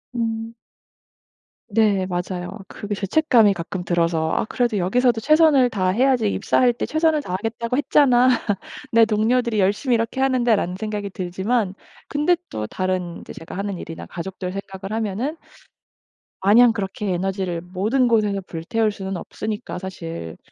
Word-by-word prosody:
음. 225 0 -2 1.2
네 205 -4 +2
맞아요. 180 +2 -4
그게 205 0 -5
죄책감이 215 - +3
가끔 175 +1 -5
들어서 165 -2 +1
'아 - - 0
그래도 240 -1 0
여기서도 230 +6 +2
최선을 300 -2 +5
다해야지 220 +4 +2
입사할 250 -1 +2
때 235 - -3
최선을 315 -1 +2
다하겠다고 225 +5 -3
했잖아. 255 -3 +4 0.6
내 230 0 +7
동료들이 225 +1 +1
열심히 205 +7 +2
이렇게 230 +3 -1
하는데'. 250 -4 +3
라는 180 -2 -2
생각이 210 -2 -3
들지만 190 +3 -1 0.3
근데 300 +5 +2
또 110 0 -4
다른 185 -2 -2
이제 - - -10
제가 165 - -9
하는 200 -1 -3
일이나 165 -1 -8
가족들 180 +1 -6
생각을 195 0 -6
하면은 225 - -2 1.1
마냥 230 +5 +6
그렇게 200 -2 -3
에너지를 185 -1 -2
모든 205 +9 0
곳에서 210 -4 +2
불태울 210 +6 -1
수는 195 -2 -5
없으니까 215 -1 -5
사실 165 - -7
210 Hz, 340 characters per minute, -22 LUFS, 185-240 Hz, 1.2 s, 내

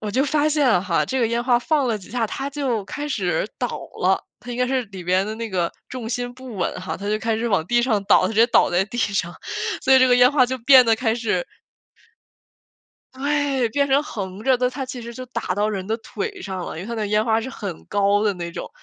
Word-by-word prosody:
我 210 -1 -4
就 260 +6 +2
发 300 +1 +2
现 265 - +3
哈， 170 -3 +1
这 265 - -1
个 230 - +3
烟 235 +1 0
花 245 -1 +4
放 290 +1 +1
了 225 - +1
几 190 - -14
下， 235 -2 0
它 270 +6 -4
就 260 -8 -2
开 295 +8 -5
始 185 - -1
倒 245 - -1 0.3
了， 190 +1 +2 0.2
它 245 - -9
应 240 - -4
该 250 - +2
是 260 0 0
里 190 -3 -9
边 185 +2 +2
的 215 - -4
那 230 0 -5
个 175 -3 0 0.2
重 240 -3 -5
心 245 0 -3
不 255 -3 -10
稳 180 - -1
哈， 185 - -4
它 200 +1 -5
就 215 - +1
开 225 0 -1
始 235 +2 -2
往 185 -6 +1
地 240 +3 +2
上 220 -5 +1
倒， - - +5
它 185 - +1
直 220 - -5
接 230 +2 +5
倒 230 - +4
在 180 +2 +2
地 240 - -8
上， 195 -6 -1 0.5
所 265 - +5
以 265 - +8
这 255 0 +5
个 245 - +5
烟 250 +2 +6
花 255 -4 +4
就 260 +1 -2
变 255 +1 +7
得 225 -1 +4
开 225 -2 0
始 240 - -1 1.7
对， 280 -3 0
变 280 +5 +1
成 275 +2 +3
横 200 -6 -6
着 260 -1 +3
的， 250 0 +2
它 265 +1 -5
其 255 -1 -7
实 235 0 -8
就 255 - -7
打 235 -7 -3
到 205 +2 +1
人 190 -2 -4
的 220 +1 -1
腿 405 - -6
上 190 -2 -5
了， - - -6
因 - - -5
为 195 - -8
它 235 - -4
那 220 - -2
个 - - -1
烟 210 +1 +1
花 225 -1 +2
是 255 - -5
很 200 -9 -7
高 205 +1 +2
的 205 -2 +1
那 170 -1 -5
种。 - - -6
230 Hz, 285 characters per minute, -22 LUFS, 200-260 Hz, 1.7 s, 以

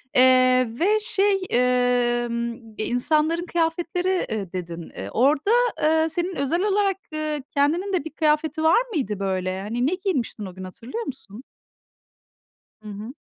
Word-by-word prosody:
Eee, 255 -1 +5
ve, 420 +5 +3
şey, 410 -1 +2 0.9
ımm, 235 0 -3 0.2
e, 215 - -2
insanların 310 +7 +1
kıyafetleri, 345 +2 -1
ııı, 200 -5 -3
dedin. 170 -2 -6
Iıı, - - -7
orada, 285 - +2 0.3
ııı, 320 +1 +3
senin 350 +3 -2
özel 325 +7 0
olarak, 400 -2 +1 0.2
ııı, 310 -1 -2
kendinin 330 +8 +1
de 360 - +1
bir 320 - -6
kıyafeti 310 0 0
var 325 +9 +5
mıydı, 215 - -2
böyle? 185 -1 -2
Hani, 235 +6 -1
ne 365 - +1
giymiştin 280 - -2
o 185 - -9
gün, 190 - -8
hatırlıyor 235 - -6
musun? 245 - -9 1.4
Hı 210 - -8
hı. 210 +5 -7
300 Hz, 145 wpm, -23 LUFS, 230-345 Hz, 1.4 s, Eee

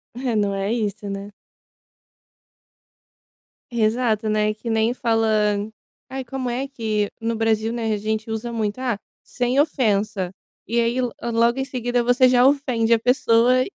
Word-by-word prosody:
É, 245 -2 -2
não 205 -1 +1
é 195 +2 -1
isso, 210 -2 -3
né. 200 +1 -5 2.4
Exato, 225 -1 +1
né, 215 0 +1
que 225 +2 -7
nem 225 +1 +2
fala 225 -3 +1 0.8
aí, 265 0 -4
como 255 0 -4
é 260 +3 -3
que 215 -5 -1
no 230 0 -1
Brasil, 225 0 +1
né, 225 -2 -2
a - - 0
gente 220 +1 -3
usa 220 +2 -3
muito: 215 0 -2
"Ah, 250 -5 -1 0.2
sem 250 +2 -1
ofensa", 210 - +1 0.3
e 235 +2 0
aí, 235 +2 +1
lo 245 -2 -1 0.2
logo 235 +3 +3
em 265 - -1
seguida 245 -2 -1
você 245 +2 +4
já 250 0 +5
ofende 255 -5 +2
a 230 - +4
pessoa 250 0 +3
230 Hz, 150 wpm, -22 LUFS, 215-250 Hz, 2.4 s, já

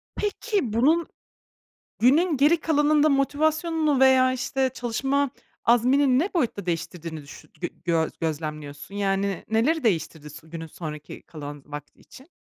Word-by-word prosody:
Peki, 410 - -1
bunun 310 +9 +3 0.9
günün 300 +7 +4
geri 300 +5 +4
kalanında 300 -1 +3
motivasyonunu 305 +1 +1
veya 260 -1 +5
işte 260 +1 -1
çalışma 270 +3 0 0.3
azmini 255 +3 +4
ne 365 +5 -1
boyutta 230 - -1
değiştirdiğini 165 -2 -4
düşü 140 - -13
gö 175 - -2 0.2
gö 165 -2 +1
gözlemliyorsun? 150 0 -5
Yani 195 -1 -1
neleri 275 +9 +2
değiştirdi 160 -6 -1
s 155 +2 -13
günün 165 0 -7
sonraki 155 -2 -8
kalan 145 -2 -9
vakti 150 0 -9
için? 265 +6 -16
245 Hz, 125 wpm, -25 LUFS, -, 0.9 s, veya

